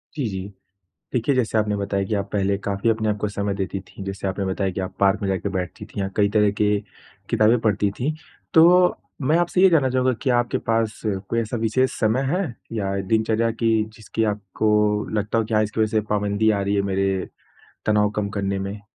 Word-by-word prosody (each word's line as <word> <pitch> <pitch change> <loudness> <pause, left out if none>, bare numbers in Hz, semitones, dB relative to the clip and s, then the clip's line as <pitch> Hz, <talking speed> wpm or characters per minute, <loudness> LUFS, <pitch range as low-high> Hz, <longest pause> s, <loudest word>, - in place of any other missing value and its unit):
जी, 145 -4 -1
जी। 95 -1 -5 0.7
देखिए, 125 +3 +1
जैसे 115 -3 +1
आपने 105 -1 +1
बताया 100 -1 -1
कि 110 - -3
आप 100 0 -2
पहले 100 -1 +1
काफ़ी 100 +3 0
अपने 110 -1 +1
आपको 105 0 -1
समय 100 0 -2
देती 95 0 -3
थीं, 95 +1 -11
जैसे 95 0 -4
आपने 95 +1 -2
बताया 95 0 -1
कि 95 - -5
आप 95 - -5
पार्क 100 +1 +3
में 100 - -1
जाके 95 +1 -1
बैठती 95 +1 -4
थी 100 - -6
या 95 - -1
कई 100 -1 +3
तरह 105 -1 +3
के 105 +1 0 0.6
किताबें 110 +3 +4
पढ़ती 105 -2 +1
थी। 145 +5 0 0.4
तो, 180 +2 +6 0.3
मैं 150 +5 +3
आपसे 175 +1 +1
ये 190 - +8
जानना 150 -6 +3
चाहूँगा 130 0 +2
कि 135 - 0
आपके 120 -1 +2
पास 115 -1 -1
कोई 100 +2 -1
ऐसा 115 +1 -2
विशेष 115 +4 +1
समय 110 +4 +2
हैं 190 +2 0 0.3
या 100 -2 -1
दिनचर्या 110 +3 +1
कि 115 0 +1 0.2
जिसकी 110 +1 -3
आपको 105 0 -1 0.5
लगता 105 +3 -1
हो 115 - +2
कि 110 - -5
हाँ, 110 0 +4
इसकी 110 +1 -2
वजह 110 - +3
से - - +3
पाबंदी 105 +1 +1
आ 100 -2 0
रही 100 +1 0
हैं 100 - +2
मेरे 95 0 0 0.6
तनाव 105 -1 +3
कम 105 -1 0
करने 100 0 -1
में? 100 +2 -5
105 Hz, 210 wpm, -23 LUFS, 100-115 Hz, 0.7 s, ये